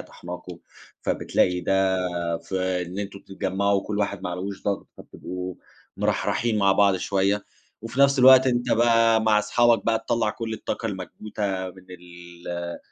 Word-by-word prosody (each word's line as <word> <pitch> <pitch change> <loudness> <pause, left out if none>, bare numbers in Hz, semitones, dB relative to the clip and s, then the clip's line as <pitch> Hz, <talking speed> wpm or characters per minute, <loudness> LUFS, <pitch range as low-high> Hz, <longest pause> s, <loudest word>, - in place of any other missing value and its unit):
طاحناكم، 90 0 -9 0.4
فبتلاقي 90 0 +1
ده 95 0 +2 0.5
في 95 -1 -2
إن 95 +3 -6
أنتم 100 -1 -6
تتجمّعوا 95 +1 -1
وكل 105 +1 -4
واحد 100 -2 -2
ما 90 - -2
عليهوش 95 +3 -5
ضغط 100 -1 -2
فتبقوا 90 0 -7 0.4
مرحرحين 115 -2 0
مع 100 -1 +4
بعض 100 -1 +4
شوية 100 +2 0 0.4
وفي 115 +4 -6
نفس 140 0 +5
الوقت 130 +1 +8
أنت 120 -1 0
بقى 115 -1 +4
مع 110 -1 +4
اصحابك 115 +2 +2
بقى 115 -1 +2
تطلّع 115 -2 +1
كل 115 0 -5
الطاقة 110 - -4
المكبوتة 95 -1 -4
من 95 0 -17
ال 85 -1 -8
100 Hz, 145 wpm, -24 LUFS, 90-110 Hz, 0.5 s, الوقت